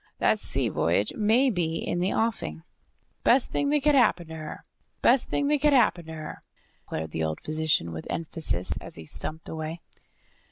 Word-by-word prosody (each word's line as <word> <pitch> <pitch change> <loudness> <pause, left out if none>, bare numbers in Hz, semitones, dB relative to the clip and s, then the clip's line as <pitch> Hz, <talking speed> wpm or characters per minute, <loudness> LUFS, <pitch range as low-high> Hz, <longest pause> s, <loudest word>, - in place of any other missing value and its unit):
"That - - +2
sea - - -1
voyage 95 +5 +1
may 230 +5 +3
be 170 -5 -1
in 175 - -2
the 185 +2 +1
offing." 195 - -1 0.6
"Best 255 +1 +4
thing 285 - 0
that 295 0 +2
could 300 - +4
happen 185 - +3
to 160 - -7
her, 155 -1 -7 0.4
best 250 +1 +5
thing 285 - 0
that 295 -2 +2
could 295 -1 +4
happen 180 - +3
to 160 - -7
her!" 155 -1 -7 0.4
declared 80 0 -4
the 80 - -2
old 80 0 -2
physician 155 - 0
with 80 -1 -7
emphasis, 160 - -1
as - - -10
he 80 - -9
stumped 155 - -5
away. 160 +1 -5
165 Hz, 185 wpm, -27 LUFS, 150-235 Hz, 0.6 s, best